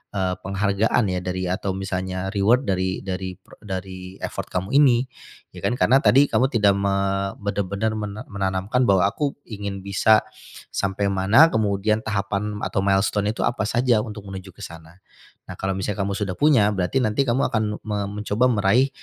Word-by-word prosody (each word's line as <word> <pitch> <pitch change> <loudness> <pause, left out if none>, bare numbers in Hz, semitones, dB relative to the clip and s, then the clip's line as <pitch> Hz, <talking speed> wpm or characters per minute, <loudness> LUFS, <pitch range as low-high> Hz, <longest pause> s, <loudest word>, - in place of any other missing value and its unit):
eee, 95 -2 0
penghargaan, 100 +4 +1
ya, 90 - -1
dari 95 0 -3
atau 95 +1 -2
misalnya 95 -1 -3
reward 110 +6 +3
dari 95 -1 -1
dari 95 -1 -4
prek - - -19
dari 95 -1 -7
effort - - -5
kamu 95 +2 -3
ini, 130 -4 +5 0.5
ya, - - -9
kan. 120 - +1
Karena 135 - +5
tadi 140 +3 +5
kamu 130 - +2
tidak 105 -4 +3
me 100 0 0 0.4
benar-benar 100 +1 -2
men 105 -1 -5
menanamkan 100 +5 -1
bahwa 95 -3 +4
aku 140 +7 -1 0.2
ingin 100 -3 -5
bisa 105 +2 +4 0.5
sampai 100 +1 -1
mana, 100 +12 +5
kemudian 105 0 +1
tahapan 105 -1 -2
atau 95 - -1
milestone 100 +1 +1
itu - - -5
apa 120 - -1
saja 120 -1 +2
untuk 105 -2 -8
menuju 95 -1 -8
ke - - -15
sana. 80 -1 -12 0.6
Nah, - - -5
kalau 95 0 -1
misalnya 100 +1 -2
kamu 100 0 -2
sudah 100 -3 -2
punya, 130 -9 +4
berarti 95 +6 -1
nanti 110 +3 +1
kamu 120 +3 +2
akan 110 -1 +1 0.2
me 105 -1 -2
mencoba 105 +3 0
meraih 115 +4 +3
100 Hz, 170 wpm, -23 LUFS, 95-110 Hz, 0.6 s, ini